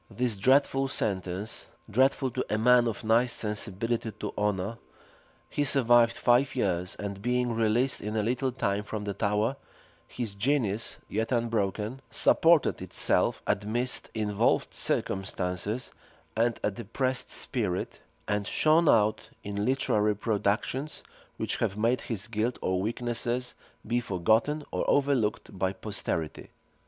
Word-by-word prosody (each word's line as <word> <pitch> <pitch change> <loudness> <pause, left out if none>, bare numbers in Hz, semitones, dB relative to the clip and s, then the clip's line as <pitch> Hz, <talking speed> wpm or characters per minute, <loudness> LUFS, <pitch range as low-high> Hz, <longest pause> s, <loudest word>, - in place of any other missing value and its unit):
This 120 -3 0
dreadful 135 +5 +3
sentence, 95 -3 -3 0.2
dreadful 130 +3 +2
to 130 +2 -2
a 105 - +1
man 120 +2 +5
of 115 -1 -4
nice 115 +2 +3
sensibility 110 +1 -2
to 105 0 -6
honor, 105 +2 -1 0.7
he 145 - -1
survived 120 -4 +4
five 125 +3 +3
years; 90 -6 -1
and 100 -1 -6
being 125 +1 0
released 115 +4 +1
in 105 +1 -4
a 105 - +1
little 130 +4 0
time 105 -5 -1
from 105 0 -5
the 100 -1 -3
Tower, 105 +7 0 0.5
his 115 -5 -4
genius, 110 -1 0
yet 110 +4 -2
unbroken, 115 0 -1
supported 165 -2 +5
itself - - 0
amidst 115 +5 -1
involved 105 -2 +1
circumstances 95 +4 -2 0.4
and 115 +1 +1
a 105 - +1
depressed 130 +6 -2
spirit, 105 -9 -2 0.3
and 105 -1 -1
shone 155 +1 +4
out 110 -1 +2
in 100 0 -3
literary 105 -5 +2
productions 110 +7 -1 0.3
which - - -1
have 95 - -1
made 115 +4 +1
his 105 -4 -4
guilt 110 +3 -1
or 95 0 0
weaknesses 120 +3 -2 0.3
be 120 +3 +1
forgotten 115 - +1
or - - -1
overlooked 135 -10 +1
by 95 0 0
posterity. 95 -6 -4
110 Hz, 130 wpm, -28 LUFS, 105-125 Hz, 0.7 s, man